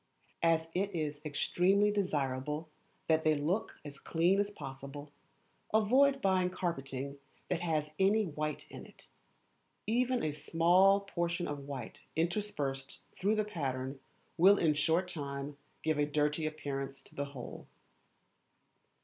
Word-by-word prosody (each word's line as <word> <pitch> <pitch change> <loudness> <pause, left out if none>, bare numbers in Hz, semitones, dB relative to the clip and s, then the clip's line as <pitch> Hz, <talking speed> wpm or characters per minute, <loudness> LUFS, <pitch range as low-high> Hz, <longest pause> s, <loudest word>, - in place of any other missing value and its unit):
As 165 -1 +3
it 195 +1 -1
is 150 -2 -2
extremely 180 +7 +2
desirable 150 -5 -1 0.4
that 160 0 +3
they 155 -1 +4
should 145 - -3
look 185 +8 -1
as 140 -1 -8
clean 175 +4 +2
as 205 0 +1
possible, 140 -3 -8 0.6
avoid 265 +6 +4
buying 185 -2 +3
carpeting 140 -6 -3 0.3
that 180 - 0
has 155 -3 -1
any 205 +3 +4
white 150 -2 -3
in - - -9
it. - - -14 0.8
Even 250 +3 +2
a - - -2
very 155 - 0
small 175 +6 +4
portion 170 -3 -2
of 145 -1 -5
white 130 -5 -6
interspersed 160 -6 -1 0.2
through 205 +3 +1
the 215 - +2
pattern 135 -7 -3 0.4
will 195 +4 +7
in 165 -4 +3
a - - +2
short 160 +5 +2
time 140 -4 -5 0.3
give 155 -1 +1
a 145 - +4
dirty 150 +1 +1
appearance 140 -3 -4
to - - -16
the 140 - -2
whole. 140 -4 -9
160 Hz, 140 wpm, -33 LUFS, 145-190 Hz, 0.8 s, will